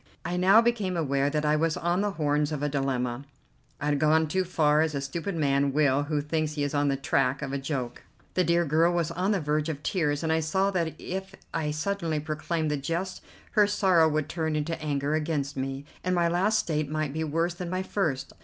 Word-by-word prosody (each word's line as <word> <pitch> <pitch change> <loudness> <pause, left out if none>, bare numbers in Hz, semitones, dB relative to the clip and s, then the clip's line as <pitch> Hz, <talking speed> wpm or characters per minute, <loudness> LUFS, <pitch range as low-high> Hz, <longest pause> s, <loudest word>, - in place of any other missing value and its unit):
I 175 - -2
now 195 +5 +6
became 210 -7 0
aware 140 -3 +1
that 150 +1 -1
I 150 0 +3
was 160 0 +1
on 175 +3 0
the 205 - +1
horns 150 -2 0
of 150 -2 -3
a 145 - +1
dilemma; 135 -3 -1 0.6
I - - -4
had 145 -1 +1
gone 155 +1 +3
too 185 +5 0
far, 155 -4 +3
as 160 -2 0
a - - 0
stupid 170 +7 -4
man 140 -3 +1
will 145 -1 +3
who 150 -1 -1
thinks 155 +1 -1
he 145 -1 -2
is 145 - -2
on 145 0 +2
the 140 - +2
track 135 -1 0
of 140 -1 -4
a 140 - -1
joke. 135 -4 -4 0.3
The 185 - +2
dear 170 0 +2
girl 160 +3 +3
was 170 -3 0
on 185 +3 -1
the 205 -2 +2
verge 150 0 0
of 150 -2 -5
tears, 150 -5 0
and 160 0 +1
I 160 - +2
saw 190 +5 +1
that 170 -4 -1
if 190 +1 -6 0.2
I 160 -2 -1
suddenly 160 0 -1
proclaimed 155 +1 -2
the 150 - 0
jest 170 +6 -3 0.3
her 210 -2 +4
sorrow 185 -6 +4
would 155 -1 -1
turn 160 -2 -2
into 155 +2 -2
anger 145 -1 -1
against 150 -3 -1
me, 135 +1 -4 0.2
and 185 0 +1
my 170 -1 +3
last 190 +6 +2
state 155 -8 -1
might 155 -2 -2
be 160 +1 -2
worse 165 +3 0
than 175 0 -6
my 185 +1 -1
first. 160 -9 -2
155 Hz, 230 wpm, -27 LUFS, 145-175 Hz, 0.6 s, now